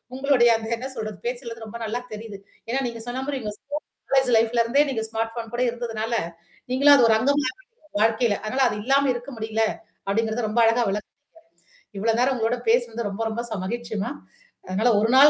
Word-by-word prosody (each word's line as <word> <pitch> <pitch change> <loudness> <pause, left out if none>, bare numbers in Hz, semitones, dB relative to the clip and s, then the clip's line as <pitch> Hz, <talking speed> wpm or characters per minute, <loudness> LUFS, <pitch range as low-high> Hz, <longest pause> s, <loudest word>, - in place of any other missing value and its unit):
உங்களுடைய 265 -3 +4
அந்த 220 0 -7
என்ன 255 +3 -5
சொல்றது 215 -3 -5
பேசுது 240 -2 -5
ரொம்ப 220 +2 -7
நல்லா 225 +2 -2
தெரியுது. 215 -1 -7 0.3
ஏன்னா 260 +3 +1
நீங்க 230 -1 -6
சொன்ன 255 +2 -3
மாரி 280 -2 -2
உங்க 210 -2 -4
ஸ்கூல் 290 +2 -6 0.3
காலேஜ் 265 -2 +4
லைஃப்ல 230 +1 +3
இருந்தே 265 +6 +4
நீங்க 225 -4 -1
ஸ்மார்ட் 225 0 -2
ஃபோன் 230 -1 -5
கூட 245 - +1
இருந்ததுனால, 230 -1 -3 0.6
நீங்களும் 285 +2 +7
அது 245 - +6
ஒரு 220 - +6
அங்கம்னு 275 +1 +1 0.5
வாழ்க்கையில. 220 0 +3
அதனால 260 +5 0
அது 210 - -3
இல்லாம 275 +1 +3
இருக்க 245 +3 -7
முடியல. 220 0 0 0.4
அப்படிங்கிறத 225 +3 0
ரொம்ப 230 +2 +1
அழகா 230 +1 +4
விளக்குனீங்க. 210 +7 -5 0.8
இவ்வளோ 225 +2 +2
நேரம் 260 +1 +3
உங்களோட 235 +1 0
பேசனது 235 -2 +1
ரொம்ப 220 +3 -3
ரொம்ப 235 +2 -3
ச 215 -4 -3
மகிழ்ச்சிமா. 230 +2 -3 0.6
அதனால 210 +6 +2
ஒரு 225 +2 +2
நாள் 280 +2 +10
235 Hz, 185 wpm, -24 LUFS, 220-255 Hz, 0.8 s, நாள்